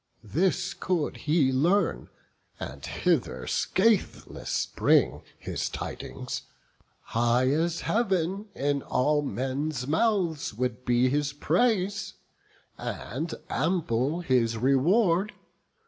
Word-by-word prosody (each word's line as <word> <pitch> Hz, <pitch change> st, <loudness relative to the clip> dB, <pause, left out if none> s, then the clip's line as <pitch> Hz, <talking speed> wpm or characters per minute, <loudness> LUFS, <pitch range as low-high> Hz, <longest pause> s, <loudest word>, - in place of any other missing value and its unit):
This 180 Hz, -, 0 dB
could 175 Hz, -5 st, -1 dB
he 150 Hz, -3 st, +2 dB
learn, 155 Hz, -, +1 dB, 0.5 s
and 70 Hz, +1 st, -7 dB
hither 65 Hz, 0 st, 0 dB
scatheless 210 Hz, -, 0 dB
bring -, -, +3 dB, 0.2 s
His -, -, -3 dB
tidings, -, -, -5 dB, 0.6 s
high 120 Hz, +3 st, +2 dB
as 165 Hz, +3 st, 0 dB
Heav'n 195 Hz, -2 st, 0 dB
in 140 Hz, 0 st, 0 dB
all 145 Hz, +4 st, +1 dB
men's 135 Hz, 0 st, -2 dB
mouths 165 Hz, -, 0 dB
Would 125 Hz, +1 st, -2 dB
be 125 Hz, +1 st, +3 dB
his 145 Hz, +1 st, 0 dB
praise, 200 Hz, +6 st, +1 dB, 0.6 s
and 155 Hz, +9 st, -4 dB, 0.2 s
ample 155 Hz, -2 st, 0 dB
his 120 Hz, -7 st, +1 dB
reward. 170 Hz, -, +3 dB
150 Hz, 95 wpm, -27 LUFS, 125-180 Hz, 0.6 s, bring